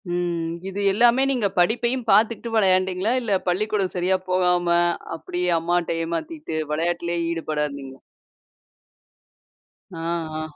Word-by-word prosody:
ம். 170 -2 -2 0.2
இது 195 +1 -5
எல்லாமே 240 +5 +4
நீங்க 240 -6 +1
படிப்பையும் 240 +6 +1
பார்த்துகிட்டு 220 +3 +2
வெளையாண்டீங்களா? 190 +1 +2
இல்லை, 215 -5 +1
பள்ளிக்கூடம் 195 +1 0
சரியா 185 +1 +1
போகாம 180 -1 +2 0.5
அப்படியே 180 +2 -3
அம்மாட்ட 175 +1 0
ஏமாத்திட்டு 170 - -4 0.2
வெளையாட்டுலயே 170 +2 -1
ஈடுபடா 155 -3 -2
இருந்தீங்களா? 135 -2 -9 1.9
ஆ. - - -8 0.4
ஆ. - - -3
180 Hz, 110 wpm, -23 LUFS, 170-215 Hz, 1.9 s, எல்லாமே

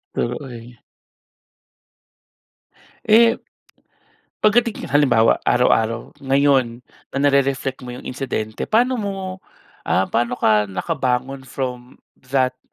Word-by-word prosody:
True, 120 +1 -1
uy. 120 -3 -10 2.3
Eh, 230 +2 +5 1.0
pagdating 225 +1 +2
halimbawa, 130 -6 +4
araw-araw 115 -2 +1
ngayon 135 -3 +2 0.3
na - - -2
nare-reflect 135 -2 +1
mo 125 - -7
yung 125 - -9
insidente 125 -5 -4
paano 245 +3 +2
mo, 200 -3 -3 0.7
ah, 95 0 +1
paano 120 +1 0
ka 105 -3 +2
nakabangon 130 - -2
from 125 -1 -6 0.3
that 130 -1 +1
130 Hz, 95 wpm, -20 LUFS, 120-145 Hz, 2.3 s, Eh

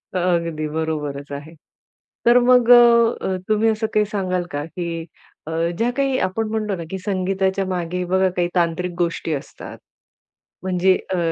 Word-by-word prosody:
अगदी 170 -3 0
बरोबरच 150 -2 -4
आहे. 145 +3 -7 0.7
तर 240 +1 +6
मग 250 -1 +4
अ, 235 -5 +5
तुम्ही 215 +1 +3
असं 220 0 0
काही 210 0 +3
सांगाल 185 -3 -2
का? 145 +1 -3
की 165 -1 -5 0.4
अ, - - -4 0.3
ज्या 235 +3 +1
काही 275 -1 +1
आपण 220 +4 -1
म्हणतो 215 -2 -2
ना, 170 - -5
की 190 - -4
संगीताच्या 190 0 0
मागे 180 0 -2
बघा 190 +1 +2
काही 175 - +2
तांत्रिक 175 +1 0
गोष्टी 170 -1 -1
असतात. 140 - -7 0.9
म्हणजे 185 0 +2 0.2
अ, - - 0
185 Hz, 150 wpm, -21 LUFS, 170-215 Hz, 0.9 s, तर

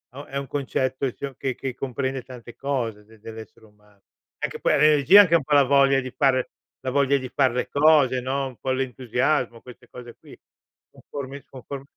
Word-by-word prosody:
o 140 +1 -8
è 140 - -6
un 140 -1 -4
concetto 130 -1 -2
sio 140 -2 -7
che 135 -1 -3
che 130 -3 -5
comprende 130 0 -3
tante 120 -2 -12
cose 120 -7 -3
de 110 0 -20
dell'essere 110 0 -11
umano. 105 -1 -27 0.4
Anche - - -3
poi - - +1
l'energia, 150 +6 +7
anche 170 -4 +3
un 160 - +2
po' 150 - -2
la 145 - +7
voglia 135 0 +4
di 130 - -6
fare 130 -1 +1 0.3
la 130 - -3
voglia 140 0 +2
di 130 -1 -6
far 130 -1 +2
le 125 +1 -2
cose, 140 -4 +4
no, 135 +1 -2
un 125 - -11
po' 130 - -3
l'entusiasmo, 125 -1 -1
queste 125 -1 -15
cose 120 -1 -11
qui. - - -15 0.6
Conformi 140 0 -9
conform 135 +1 -9
130 Hz, 190 wpm, -24 LUFS, 125-140 Hz, 0.6 s, l'energia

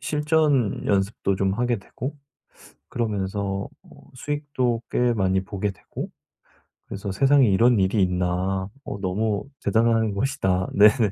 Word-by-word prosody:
실전 150 -6 +1
연습도 100 -1 0
좀 95 0 +1
하게 120 +2 0
되고 130 +8 -7 0.7
그러면서 100 -3 -2
어 - - -20 0.3
수익도 130 -4 -2
꽤 125 -1 +2
많이 95 -2 +1
보게 100 +1 -3
되고 95 - -8 0.8
그래서 100 0 -5
'세상에 135 +6 +4
이런 115 +4 +4
일이 95 +2 +2
있나? 90 +1 -1 0.2
어 100 - -5
너무 100 +2 -1 0.2
대단한 115 -2 +2
것이다.' 100 -6 0
네네. 105 +1 +5
105 Hz, 260 characters per minute, -24 LUFS, 95-125 Hz, 0.8 s, 네네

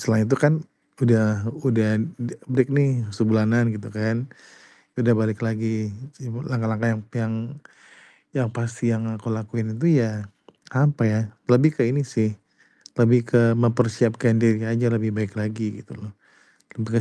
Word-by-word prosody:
setelah 110 -1 +2
itu 135 +5 +2
kan 145 +3 +5 0.5
udah 110 -4 +3 0.2
udah 110 +5 +1
de 120 -1 -5
break 130 0 +2
nih 135 -4 +2
sebulanan 110 +2 +2
gitu 105 +3 -9
kan. 110 +3 -2 0.7
Udah 120 -1 +4
balik 110 -1 -1
lagi 110 -1 -2 0.3
sibu 125 -1 -7
langkah-langkah 115 -5 -1
yang 110 - -5
yang 115 -1 -1 1.0
yang 125 -4 0
pasti 115 0 -2
yang 110 0 -3
aku 110 +2 -4
lakuin 110 0 -4
itu 165 +3 +4
ya, 105 -2 -5 0.4
apa 140 -1 +2
ya, 110 0 +1 0.3
lebih 130 +6 +6
ke - - +3
ini 140 +2 0
sih, 110 -5 -1 0.6
lebih 120 +1 +6
ke 115 -1 +5
mempersiapkan 115 0 +2
diri 110 -1 +3
aja 115 +1 +1
lebih 110 -1 0
baik 105 -1 -4
lagi, 105 -1 -4
gitu - - -15
loh. 105 -1 -12 0.7
Lebih 110 0 -4
115 Hz, 150 wpm, -23 LUFS, 110-120 Hz, 1.0 s, lebih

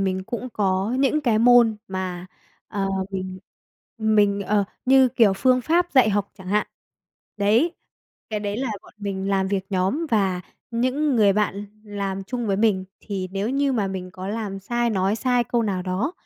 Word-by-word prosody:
mình 190 -1 -1
cũng 250 +3 -5
có 195 +4 0
những 280 +3 +2
cái 235 -6 +2
môn 235 -1 +6
mà, 185 -1 -4 0.4
ờ, 195 -2 -2 0.2
mình 185 -1 -5 0.6
mình, 210 -2 +3
ờ 205 +1 +1 0.2
như 265 -1 +6
kiểu 225 -4 +4
phương 255 +4 +3
pháp 345 +6 +1
dạy 255 -6 +5
học 200 0 -1
chẳng 185 - -11
hạn, 210 +1 +1 0.7
đấy. 225 +12 +2 0.6
Cái 210 - -2
đấy 205 0 -3
là 265 -2 -1
bọn - - -17
mình 195 -1 -3
làm 190 -1 +1
việc 195 -1 -1
nhóm 195 - 0
và 195 -5 +1 0.3
những 255 +4 +1
người 205 -3 +5
bạn 205 0 -1 0.2
làm 195 -2 -4
chung 240 +2 -3
với 195 -1 +1
mình 205 -3 +2 0.2
thì 190 -3 -4
nếu 200 +4 -1
như 275 0 +1
mà 210 -5 0
mình 185 -1 -5
có 185 +1 -7
làm 205 -2 -3
sai, 240 +3 0
nói 195 +1 +1
sai 245 -1 +1
câu 235 0 0
nào 190 -4 -1
đó, 190 - -1
205 Hz, 180 wpm, -23 LUFS, 195-240 Hz, 0.7 s, môn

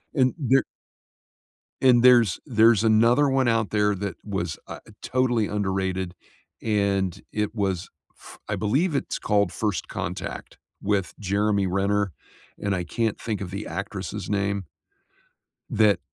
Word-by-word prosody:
and 130 -3 +3
there 135 -2 +3 1.2
and 125 -2 +5
there's 120 -7 +5
there's 115 -4 +4
another 115 +6 +4
one 135 -2 +2
out 115 -2 +1
there 105 -1 +2
that 95 -2 -4
was, 95 -6 -3
uh, - - -7 0.2
totally 125 -4 +1
underrated, 95 -3 -2 0.5
and 100 -4 0
it 105 0 -2
was, 95 -3 -1 0.3
f - - -14
I - - -1
believe 140 - +1
it's 140 - -2
called 100 -1 +1
First 105 -4 -2
Contact - - -5 0.2
with 100 -2 0
Jeremy 100 0 +1
Renner, 100 +1 0 0.5
and 100 -1 -1
I 90 -1 -2
can't 110 +4 -1
think 110 -4 -3
of 95 -3 -5
the 100 +2 -5
actress' 100 0 -5
name 100 -1 -1 1.1
that 105 -2 +4
105 Hz, 135 wpm, -25 LUFS, 95-115 Hz, 1.2 s, and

